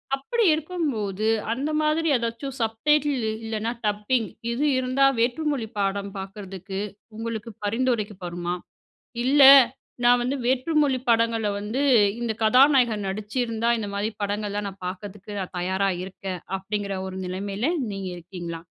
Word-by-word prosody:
அப்படி 455 - -1
இருக்கும்போது, 270 - -2 0.3
அந்த 280 +5 -2
மாதிரி 310 +2 +1
ஏதாச்சும் 235 +3 -4
சப்டைட்டில் 270 +3 +1
இ - - 0
இல்லனா, 220 +1 -2
டப்பிங் 210 +3 0 0.2
இது 265 +5 0
இருந்தா 255 +2 +2
வேற்று 245 +6 +1
மொழி 235 -6 -2
பாடம் 200 0 -1
பாக்குறதுக்கு 195 0 -7 0.4
உங்களுக்கு 230 0 -4
பரிந்துரைக்கு 225 -2 0
படுமா? 175 0 -3 0.7
இல்ல 280 +2 +5 0.6
"நான் 245 0 +6
வந்து 260 +3 -1
வேற்று 260 +5 +1
மொழி 270 -3 +2
படங்கள்ல 230 -1 +2
வந்து 215 +6 -3 0.4
இந்த 235 -2 -1
கதாநாயகர் 245 -2 +5
நடிச்சிருந்தா 225 +3 -2
இந்த 210 -2 -4
மாதிரி 205 +2 -1
படங்கள்லாம் 205 0 -2
நான் 195 -1 -12
பாக்குறதுக்கு 200 +2 -7
நான் 185 - -6
தயாரா 190 +2 0
இருக்கேன்." 190 -1 -6 0.2
அப்டீங்குற 200 0 -3
ஒரு 190 0 -6
நிலைமையில 200 +6 -2 0.2
நீங்க 195 -1 -4
இருக்கீங்களா? 175 -1 -7
220 Hz, 130 wpm, -25 LUFS, 195-255 Hz, 0.7 s, நான்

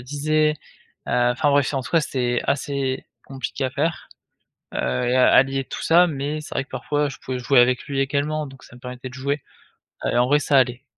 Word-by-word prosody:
disais. 150 +2 +1 0.5
Heu, 120 0 +2
enfin 145 +4 +1
bref, 140 -1 +2
en 135 - 0
tout 130 - -9
cas, 165 - +4
c'était 125 -4 -1
assez 140 -1 -1 0.2
compliqué 135 0 -5
à 130 - 0
faire, 150 +5 -2 0.6
heu, - - -3 0.3
et 125 - +2
à 130 - +5
allier 135 +1 +4
tout - - -7
ça 175 +2 +5
mais 145 0 -3
c'est 150 - -9
vrai - - -1
que - - -35
parfois 145 0 -1
je - - -9
pouvais 130 -1 -5
jouer 125 +1 +4
avec 125 0 +3
lui 140 -1 -2
également 145 +2 -1
donc 135 -1 -13
ça - - -15
me 125 - -15
permettait 125 0 -8
de - - -13
jouer 140 +2 -2 0.6
et - - +1
en 125 - +4
vrai 145 +2 +4
ça 140 0 +2
allait. 125 0 +2
135 Hz, 220 wpm, -22 LUFS, 130-145 Hz, 0.6 s, à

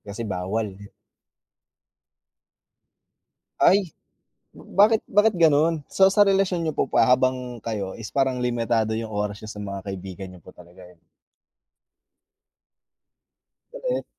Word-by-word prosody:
Kasi 105 +3 -7
bawal? 100 +3 -2 2.9
Ay, 190 -3 +4 0.7
bakit 210 +3 +2
bakit 210 +2 +3
gano'n? 160 -1 +3
So 190 0 +5
sa 205 +2 +4
relasyon 195 -3 +1
niyo 160 - -1
po - - -1
pa - - +3
habang 125 -1 +1
kayo 105 -4 -4
is 110 -2 -7
parang 130 -2 0
limitado 115 -2 0
yung 110 -1 -5
oras 105 0 -3
niya 110 - -8
sa 105 - -9
mga 100 -1 -6
kaibigan 95 -1 -7
niyo 90 - -14
po - - -19
talaga, 90 +1 -17
eh. 90 - -19 2.8
Galit. - - -2
120 Hz, 120 wpm, -24 LUFS, 105-170 Hz, 2.9 s, So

